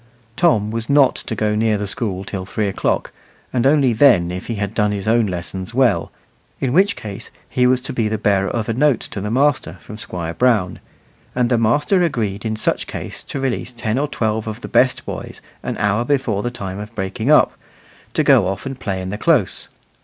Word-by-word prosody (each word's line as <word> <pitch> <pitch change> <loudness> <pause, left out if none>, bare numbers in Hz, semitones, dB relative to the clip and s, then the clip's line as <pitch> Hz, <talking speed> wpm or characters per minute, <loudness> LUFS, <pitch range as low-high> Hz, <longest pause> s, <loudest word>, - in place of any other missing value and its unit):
Tom 110 - +2
was 115 +2 -4
not 140 -2 +5
to 110 - -5
go 105 0 0
near 110 0 +2
the 105 - -3
school 100 -1 -3
till 95 -1 -5
three 100 +2 -2
o'clock, 95 - -1 0.4
and 125 0 +2
only 140 -4 +4
then 110 -8 +5
if 90 +1 -6
he 115 - -2
had 100 0 -3
done 105 -2 +1
his 100 0 -4
own 115 -1 +3
lessons 95 +3 -5
well, 130 -2 +2 0.5
in 130 -2 -1
which 195 +6 +4
case 105 -4 -8 0.2
he 125 0 +2
was 130 0 +3
to 135 +2 -5
be 115 -3 0
the 110 0 -1
bearer 100 -1 +1
of 115 -2 -2
a 115 - 0
note 135 0 +3
to 100 - -6
the 105 - -3
master 135 +3 +1
from 105 - -10
Squire 85 -5 -5
Brown; 105 -4 +1 0.6
and 125 -1 +2
the 120 - +4
master 145 - +2
agreed 110 - -1
in 110 0 -1
such 110 - -1
case - - -6
to 140 - -5
release 130 -1 -2
ten 115 0 -2
or 145 - 0
twelve 110 -5 -1
of 110 +2 -5
the - - -6
best 130 0 +2
boys - - -6 0.2
an - - -4
hour 105 +3 +1
before 125 -6 0
the 120 - -2
time 100 -5 -6
of 105 +2 -8
breaking 105 +6 -3
up, 150 - +5 0.6
to - - +3
go - - +5
off 95 0 -4
and 135 -1 -5
play 95 -6 -3
in 95 - -4
the 105 +2 -5
close. 145 - +1
110 Hz, 215 wpm, -20 LUFS, 100-130 Hz, 0.6 s, not